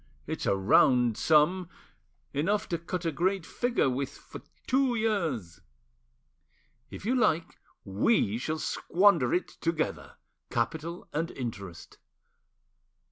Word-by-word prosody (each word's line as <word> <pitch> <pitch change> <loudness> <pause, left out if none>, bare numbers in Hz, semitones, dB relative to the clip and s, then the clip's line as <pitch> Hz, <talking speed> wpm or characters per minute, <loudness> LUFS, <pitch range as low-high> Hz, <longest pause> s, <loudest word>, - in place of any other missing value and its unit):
It's - - -4
a - - +3
round 120 +4 +4
sum—enough 165 - 0
to 170 - -1
cut 175 +1 -4
a 165 - +1
great 180 +4 0
figure 245 - 0
with 130 +1 -1
for - - -12 0.2
two 260 -1 +2
years. 165 - -1 1.3
If - - -9
you 240 - +1
like, 210 -10 +1 0.3
we 105 - +1
shall 155 +5 -2
squander 170 -5 +2
it 180 - +1
together, 165 -1 -2 0.3
capital 160 +8 -3
and 165 +3 -1
interest. 100 - -7
165 Hz, 110 wpm, -29 LUFS, 125-190 Hz, 1.3 s, round